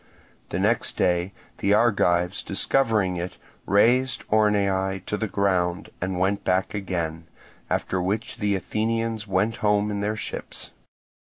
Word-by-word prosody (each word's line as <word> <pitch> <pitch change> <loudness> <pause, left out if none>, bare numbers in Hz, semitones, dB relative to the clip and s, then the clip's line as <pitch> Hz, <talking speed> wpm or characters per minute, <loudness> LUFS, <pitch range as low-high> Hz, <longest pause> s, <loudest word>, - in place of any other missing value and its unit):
The - - -2
next - - +1
day 90 +1 +1 0.3
the 100 +1 +3
Argives, 90 -5 +2
discovering 105 -4 +1
it, 90 +1 -5 0.3
razed 120 +6 +3
Orneae 100 -3 +2
to - - -2
the 110 +1 -2
ground, 95 -3 0
and 95 0 -2
went 95 +2 +1
back 95 +1 +1
again; 85 -5 -3 0.4
after 95 - 0
which 105 +5 -2
the 105 -1 +1
Athenians 110 +3 -1
went 100 +4 +1
home 105 0 +2
in 100 - -2
their 105 +1 -1
ships. - - -5
100 Hz, 135 wpm, -25 LUFS, 90-105 Hz, 0.4 s, the